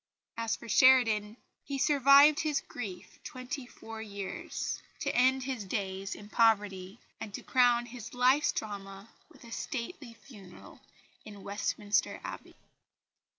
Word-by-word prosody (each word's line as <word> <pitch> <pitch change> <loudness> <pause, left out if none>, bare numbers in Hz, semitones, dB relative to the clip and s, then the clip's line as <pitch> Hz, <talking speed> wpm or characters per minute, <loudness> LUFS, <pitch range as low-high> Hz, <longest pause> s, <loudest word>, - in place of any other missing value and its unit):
As 230 -1 -1
for 235 - -12
Sheridan 225 -2 +4 0.3
he 280 - -4
survived 280 +1 +6
his 300 -3 0
grief 195 -7 -8
twenty 255 0 -6
four 225 -2 -10
years, 215 - -5 0.2
to - - -1
end 260 +1 +3
his 255 -5 -4
days 195 0 -4
in 205 - -11
poverty, 205 -3 +1 0.2
and 215 - -7
to - - -8
crown 245 -2 +3
his 240 -1 -10
life's 260 +4 +4
drama 195 0 -7 0.2
with 275 -6 -18
a 235 - -13
stately 235 0 -6
funeral 200 -8 -14 0.4
in 205 -2 -11
Westminster 205 +1 -1
Abbey. - - -8
230 Hz, 130 wpm, -30 LUFS, 205-260 Hz, 0.4 s, survived